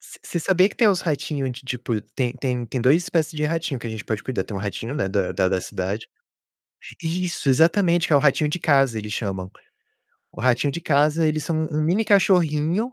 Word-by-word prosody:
você - - -15
você 170 - -3
sabia 185 +3 +3
que - - -13
tem 230 - +4
uns 190 -3 +2
ratinho 145 -3 -2
de, 125 +2 -8
tipo, 125 -4 -3
tem 125 -2 -1
tem 125 -2 -2
tem 125 +3 -3
2 140 +8 +4
espécie 165 -3 -1
de 150 - -1
ratinho 160 -3 -2
que 115 - -7
a 115 - -4
gente 110 -1 -6
pode 110 -2 -3
cuidar, 130 - -2
tem 100 - -6
um - - -4
ratinho, 110 +5 -4
né, 135 -10 -1
da 95 -1 -1
da 95 - +1
da 95 -1 0
cidade 95 +5 -4 1.0
Isso! 175 -1 -2
Exatamente, 170 +4 +3
é 145 - +6
o - - +6
ratinho 150 +1 +2
de 175 +4 -3
casa 135 -6 +3
eles 105 -1 -5
chamam. 95 -4 -4 0.8
O - - -9
ratinho 130 +3 +2
de 170 - -5
casa, 155 +1 +2
eles 155 -1 -1
são 155 -1 -1
um 150 - -1
um - - +1
mini 185 +8 +1
cachorrinho, 185 +2 +2
150 Hz, 225 wpm, -23 LUFS, 120-165 Hz, 1.0 s, é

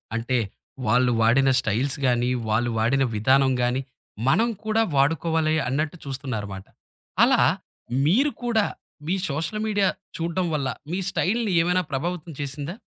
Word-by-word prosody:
అంటే 120 +2 0 0.5
వాళ్ళు 125 +2 +3
వాడిన 135 +4 +4
స్టైల్స్ 130 +5 -1
గానీ, 120 0 +2 0.2
వాళ్ళు 115 +2 +1
వాడిన 135 +5 +2
విధానం 130 +5 +3
గానీ, 125 +2 +1 0.5
మనం 225 +12 +3 0.2
కూడా 220 +1 +2
వాడుకోవాలి 160 +2 +2
అన్నట్టు 150 +6 -1
చూస్తున్నారుమాట. 110 -8 -5 0.6
అలా - - +4 0.7
మీరు 265 - +3
కూడా 225 -3 +2 0.4
మీ 185 - +1
సోషల్ 160 +9 -2
మీడియా 205 -2 +2 0.3
చూడ్డం 170 +2 -1
వల్ల 140 -3 -1 0.2
మీ 185 - -1
స్టైల్‌ని 215 +3 0
ఏవైనా 180 +2 +1
ప్రభావితం 170 +4 -3
చేసిందా? 145 - -5
140 Hz, 125 wpm, -24 LUFS, 125-180 Hz, 0.7 s, వాడిన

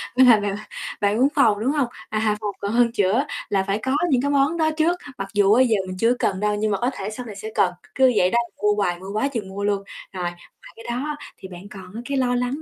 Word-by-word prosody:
Vậy 260 +1 +7
là 235 -4 +7
bạn 205 -1 -1 0.5
bạn 205 +1 +2
muốn 260 +3 +5
phòng, 220 -8 +4
đúng 245 +6 +1
hông? 285 -4 +1 0.2
À, 215 -1 0
phòng 210 -1 -2
còn 200 - -3
hơn 235 0 +3
chữa 220 +4 +2 0.2
là 195 -1 +1
phải 195 +1 -1
có 260 +1 +1
những 260 -5 +3
cái 285 +2 0
món 285 +4 +2
đó 315 -1 +2
trước, 330 +2 +3 0.2
mặc 195 -1 -4
dù 205 -1 +4
á 245 - +5
giờ 235 -4 +2
mình 185 0 -6
chưa 230 +5 +3
cần 190 - 0
đâu, 210 0 +1
nhưng 215 +1 0
mà 200 - +1
có 245 - +2
thể 195 +1 -5
sau 245 +3 -7
này 215 -4 -8
sẽ 215 +2 -6
cần, 180 -2 +3 0.2
cứ 260 -1 +5
vậy 180 - +4
đó - - +2 0.3
mua 210 0 +4
hoài 180 -4 0
mua 190 +2 -8
quá 215 +6 +1
chừng 225 -8 -4
mua 200 +1 -5
luôn. 200 -1 0 0.3
Rồi, 185 -1 -4
ngoài 175 0 -4 0.4
cái 230 - -13
đó 235 - -1
á 300 0 -3 0.2
thì - - -9
bạn 185 +2 -11
còn 195 +2 -9
cái 280 +1 -2
lo 250 -1 +1
lắng 250 +4 -1
215 Hz, 275 wpm, -23 LUFS, 200-250 Hz, 0.5 s, Vậy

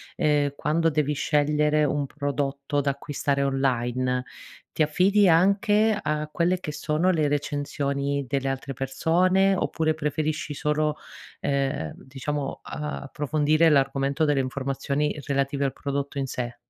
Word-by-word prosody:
ehm, 145 -2 +2
quando 165 +3 +1
devi 150 -1 0
scegliere 150 +1 +2
un 145 0 0
prodotto 140 0 -2
da 140 0 +1
acquistare 140 0 -2
online, 125 -2 0 0.5
ti 155 - +1
affidi 190 +7 +3
anche 205 +5 +3
a 150 0 -1
quelle 175 +3 +1
che 155 - -5
sono 155 +3 0
le 155 -4 +1
recensioni 140 -1 -1
delle 135 0 -1
altre 135 +1 -4
persone, 180 +9 +2
oppure 160 -3 0
preferisci 155 0 -2
solo, 150 +1 0 0.5
ehm, 135 - -1
diciamo, 135 +1 -5
uhm, 150 - -4 0.2
approfondire 150 +3 +2
l'argomento 140 0 +1
delle 145 -2 +2
informazioni 140 +3 -2
relative 140 0 0
al 135 - -1
prodotto 140 0 -4
in 135 - -1
sé. 120 -2 -4
145 Hz, 130 wpm, -25 LUFS, 140-155 Hz, 0.5 s, affidi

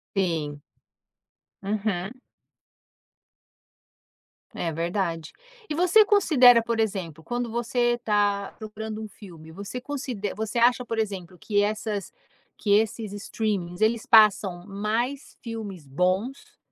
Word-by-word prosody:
Sim. 160 -6 -1 1.0
Uhum. 200 -1 -2 2.4
É 165 - -2
verdade. 170 0 -2 0.4
E 300 - -2
você 360 +6 +6
considera, 275 - +6
por 230 0 -2
exemplo, 180 -7 -2
quando 240 -1 -3
você 240 +1 +1
está 205 -3 0
procurando 220 0 -6
um 215 - -6
filme, 170 -6 -13
você 200 +8 -6
conside 250 -7 -4
você 220 +2 -3
acha, 245 +1 +4
por 230 -1 -4
exemplo, 190 -5 -3
que 205 +3 +1
essas 210 -1 -2 0.5
que 205 - -1
esses 215 0 +1
streamings. 200 -4 -3
Eles 225 +3 +1
passam 210 -6 +5
mais 225 +7 -3
filmes 210 - -7
bons, 185 - -1
215 Hz, 110 wpm, -25 LUFS, 190-235 Hz, 2.4 s, você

